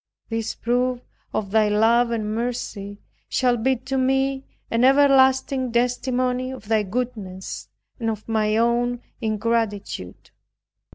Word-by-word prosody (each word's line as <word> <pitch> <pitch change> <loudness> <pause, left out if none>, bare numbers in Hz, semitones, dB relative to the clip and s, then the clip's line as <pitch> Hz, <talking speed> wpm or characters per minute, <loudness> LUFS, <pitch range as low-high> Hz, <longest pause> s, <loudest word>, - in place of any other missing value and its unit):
This 225 -1 -2
proof 245 +1 0 0.3
of 200 -3 -3
Thy 215 -1 +4
love 230 +3 +4
and 215 -2 -2
mercy, 220 -4 -4 0.3
shall 250 -2 +2
be 260 +3 +1
to 260 +2 -3
me 270 +1 +1 0.3
an 230 +1 +2
everlasting 265 -1 +4
testimony 250 +1 0
of 260 -5 -9
thy 220 -1 +3
goodness 205 -3 -5 0.3
and 225 -1 -1
of 215 -1 -5
my 215 -1 +1
own 240 +1 +1 0.2
ingratitude. 215 - -2
235 Hz, 120 wpm, -23 LUFS, 215-255 Hz, 0.3 s, Thy